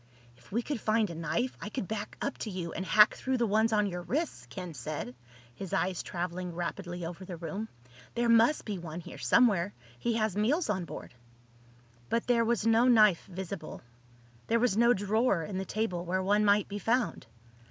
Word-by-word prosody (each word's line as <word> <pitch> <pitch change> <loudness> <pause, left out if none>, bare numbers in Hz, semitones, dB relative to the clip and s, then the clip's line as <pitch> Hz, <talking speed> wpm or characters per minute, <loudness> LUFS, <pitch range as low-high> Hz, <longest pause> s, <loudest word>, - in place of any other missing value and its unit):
"If 120 - -21
we 235 +4 0
could 285 -3 -3
find 215 -3 +2
a - - -5
knife 200 +10 -2
I - - -5
could 215 -4 -4
back 215 -1 -5
up 280 - -2
to 220 - -4
you 180 -4 -4
and 185 - -3
hack 210 +2 +6
through 260 0 -1
the 240 - +2
ones 220 +2 +2
on 210 -1 +3
your 180 -3 -3
wrists," 300 - -3
Ken 180 -3 -6
said, 130 -2 -5 0.4
his 180 +8 -7
eyes 180 +2 0
traveling 175 0 -4
rapidly 175 0 -4
over 175 +3 -7
the 180 -2 -7
room. 195 +6 -5 0.5
"There 240 0 +1
must 230 +5 +4
be 205 -4 -3
one 170 0 -6
here 140 - -10
somewhere. 190 - +3 0.2
He 235 -1 0
has 215 -4 0
meals 245 - +1
on 185 -4 -2
board." - - -9 1.0
But 230 - 0
there 240 -2 +3
was 230 -2 0
no 230 +2 +5
knife 215 -7 +5
visible. 190 -5 -7 0.6
There 230 - +3
was 240 -4 +2
no 235 +2 +5
drawer 205 -2 +1
in 190 +3 -4
the 190 - -3
table 190 -4 -2
where 185 +2 -1
one 205 +2 +3
might 205 0 +4
be 205 0 -5
found. 235 - 0
205 Hz, 195 wpm, -30 LUFS, 175-230 Hz, 1.0 s, hack